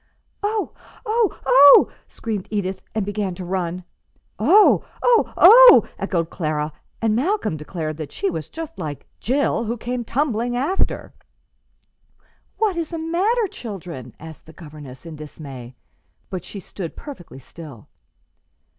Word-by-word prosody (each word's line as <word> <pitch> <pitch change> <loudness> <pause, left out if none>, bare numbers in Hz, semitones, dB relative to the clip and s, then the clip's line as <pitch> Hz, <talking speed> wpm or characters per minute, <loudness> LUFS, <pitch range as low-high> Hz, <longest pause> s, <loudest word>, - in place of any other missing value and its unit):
"Oh! 420 0 -2 0.3
oh! 440 -1 0
oh!" 270 +2 +8 0.2
screamed 215 -5 -5
Edith, 195 -3 -3
and 215 -3 0
began 200 -2 -3
to 185 0 -7
run. 180 -1 -3 0.6
"Oh! 415 +2 +5 0.2
oh! 485 -2 +3
oh!" - - +9
echoed 170 -3 -2
Clara; 155 -2 -2 0.3
and 220 -1 +2
Malcolm 275 - 0
declared 155 0 -5
that 155 -3 -7
she 200 - -2
was 165 -4 -4
just 325 0 -8
like 150 -4 -6
"Jill," 260 -2 0
who 235 +2 -3
"came 245 +2 -4
tumbling 245 -2 -1
after." 310 +10 -1 1.4
"What 415 -5 0
is 330 -2 -2
the 335 - -5
matter, 375 +9 0
children?" 170 - -8
asked 160 0 -12
their 160 - -13
governess, 150 -4 -12
in 165 -2 -8
dismay; 140 -5 -10 0.6
but 185 -3 -4
she 200 - -9
stood 180 -2 -8
perfectly 265 - -10
still. 135 -3 -12
200 Hz, 135 wpm, -21 LUFS, -, 1.4 s, oh